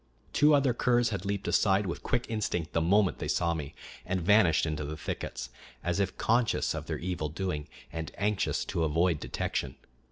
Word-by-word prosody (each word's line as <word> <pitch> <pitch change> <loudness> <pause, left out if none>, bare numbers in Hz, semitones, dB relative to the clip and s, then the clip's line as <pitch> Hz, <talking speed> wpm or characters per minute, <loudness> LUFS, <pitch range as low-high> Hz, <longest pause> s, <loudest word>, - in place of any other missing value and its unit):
Two 150 +1 +5
other 135 -3 +3
curs 120 0 +2
had 100 -3 -4
leaped 100 0 -2
aside 100 0 +3
with 85 - -4
quick 125 -2 0
instinct 100 -7 -2
the 80 - +2
moment 95 +3 +3
they - - -3
saw 85 -1 +1
me, 75 -4 -6 0.3
and 95 0 -1
vanished 90 -3 +4
into 75 -1 -2
the 75 +2 -5
thickets, 60 - -5 0.3
as 90 +2 0
if 95 -2 -1
conscious 115 0 +2
of - - -5
their - - -2
evil 85 -3 -3
doing 75 -2 -3 0.3
and 80 0 -4
anxious 105 0 0
to 85 - -1
avoid 80 +1 +2
detection. - - -3
90 Hz, 185 wpm, -29 LUFS, 80-105 Hz, 0.3 s, Two